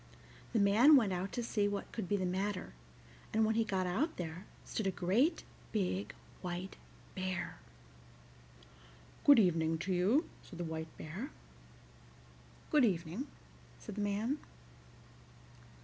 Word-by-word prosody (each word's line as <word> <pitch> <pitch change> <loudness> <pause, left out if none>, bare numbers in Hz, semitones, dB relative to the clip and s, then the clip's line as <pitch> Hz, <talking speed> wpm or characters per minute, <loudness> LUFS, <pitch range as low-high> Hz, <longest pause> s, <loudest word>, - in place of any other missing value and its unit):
The 230 - +2
man 220 +9 +7
went 220 -8 +4
out 185 +2 -2
to 240 - -2
see 210 -3 +1
what 205 0 -3
could 215 -6 -4
be 205 - +2
the 185 - -1
matter, 190 +2 -2 0.6
and 220 0 +3
when 220 - +2
he 225 +1 +3
got 190 -4 -1
out 265 - 0
there 175 +1 -5 0.2
stood 220 - -2
a - - +2
great 200 - +2 0.3
big 195 -2 -1 0.3
white 180 +1 -4 0.4
bear. 185 -1 -3 1.7
"Good 285 - +9
evening 165 -5 +3
to 185 +4 -2
you," 205 - +3
said 175 - -12
the 175 - -3
White 160 -1 -5
Bear. 190 - -6 1.4
"Good 300 -3 +5
evening," 185 - 0 0.5
said 215 - -8
the 210 - -3
man. 210 +8 0
195 Hz, 135 wpm, -34 LUFS, 180-220 Hz, 1.7 s, Good